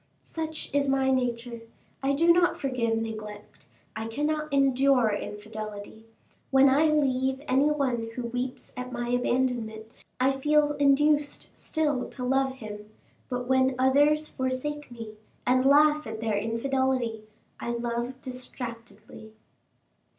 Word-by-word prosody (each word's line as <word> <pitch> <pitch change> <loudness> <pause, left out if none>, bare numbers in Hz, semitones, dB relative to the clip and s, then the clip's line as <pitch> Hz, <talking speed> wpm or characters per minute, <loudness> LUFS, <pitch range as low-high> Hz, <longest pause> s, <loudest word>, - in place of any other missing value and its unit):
"Such 315 -3 -5
is 285 -1 +2
my 270 0 +2
nature. 240 -2 -1 0.4
I 275 +1 +1
do 335 +4 +5
not 350 0 +3
forgive 240 -4 -1
neglect 215 -2 -7 0.3
I 220 +1 -4
cannot 300 +5 -2
endure 270 -3 +3
infidelity. 210 +1 -7 0.4
When 270 0 +6
I 290 +4 +4
leave 265 -3 +1
any 270 +3 +3
one 255 -6 -1
who 250 - -4
weeps 245 +2 -4
at 250 0 -6
my 240 -1 -3
abandonment, 245 -3 0 0.3
I 260 +2 +4
feel 295 +2 +2
induced 290 +1 +2
still 295 -5 -1
to 255 - -7
love 265 +1 +1
him; 210 -4 -9 0.4
but 245 -1 -3
when 260 0 +3
others 290 +4 +3
forsake 260 +3 -3
me 230 -3 -8 0.3
and 255 +1 +3
laugh 300 +1 +5
at 220 0 -6
their 220 -2 -1
infidelity, 230 +1 -1 0.3
I - - -4
love 235 +2 -3
distractedly." 240 -4 -9
255 Hz, 130 wpm, -27 LUFS, 230-280 Hz, 0.4 s, When